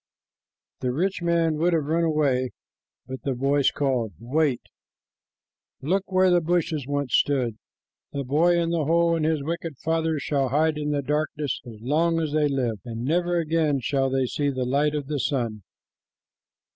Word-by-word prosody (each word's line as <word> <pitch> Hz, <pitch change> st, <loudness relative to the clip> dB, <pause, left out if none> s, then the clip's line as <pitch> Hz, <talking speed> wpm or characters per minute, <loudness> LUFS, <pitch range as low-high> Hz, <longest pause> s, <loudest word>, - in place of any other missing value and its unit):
The 125 Hz, -1 st, -1 dB
rich 185 Hz, +8 st, -1 dB
man 170 Hz, -2 st, +1 dB
would 170 Hz, +3 st, +2 dB
have 160 Hz, -3 st, +1 dB
run 165 Hz, +3 st, +1 dB
away, 140 Hz, -6 st, +1 dB, 0.6 s
but 130 Hz, 0 st, -7 dB
the 135 Hz, -2 st, -2 dB
voice 140 Hz, +2 st, +2 dB
called, 125 Hz, -6 st, -1 dB
"Wait. 135 Hz, +2 st, 0 dB, 1.2 s
Look 185 Hz, +8 st, -1 dB
where 185 Hz, 0 st, +4 dB
the 175 Hz, -1 st, +4 dB
bushes 160 Hz, -4 st, -1 dB
once 145 Hz, -3 st, -2 dB
stood. 125 Hz, -6 st, +1 dB, 0.5 s
The 140 Hz, -, -3 dB
boy 165 Hz, +6 st, +3 dB
in 170 Hz, 0 st, 0 dB
the 165 Hz, -3 st, 0 dB
hole 170 Hz, +2 st, +3 dB
and 160 Hz, -, -1 dB
his 155 Hz, -3 st, 0 dB
wicked 165 Hz, -1 st, -4 dB
father 160 Hz, +1 st, 0 dB
shall 140 Hz, -2 st, 0 dB
hide 155 Hz, +3 st, +1 dB
in 150 Hz, 0 st, -2 dB
the 145 Hz, -1 st, 0 dB
darkness 150 Hz, 0 st, -2 dB
as 110 Hz, -3 st, -10 dB
long 165 Hz, +6 st, +1 dB
as 155 Hz, -2 st, -1 dB
they 150 Hz, 0 st, +2 dB
live, 125 Hz, -6 st, -1 dB
and 115 Hz, 0 st, -5 dB
never 175 Hz, +4 st, +1 dB
again 160 Hz, -3 st, +1 dB
shall 135 Hz, 0 st, 0 dB
they 135 Hz, 0 st, +1 dB
see 145 Hz, +3 st, -1 dB
the 130 Hz, -2 st, -2 dB
light 145 Hz, +4 st, +1 dB
of 145 Hz, -2 st, -2 dB
the 145 Hz, 0 st, -3 dB
sun." 115 Hz, -6 st, -1 dB
150 Hz, 170 wpm, -25 LUFS, 135-165 Hz, 1.2 s, where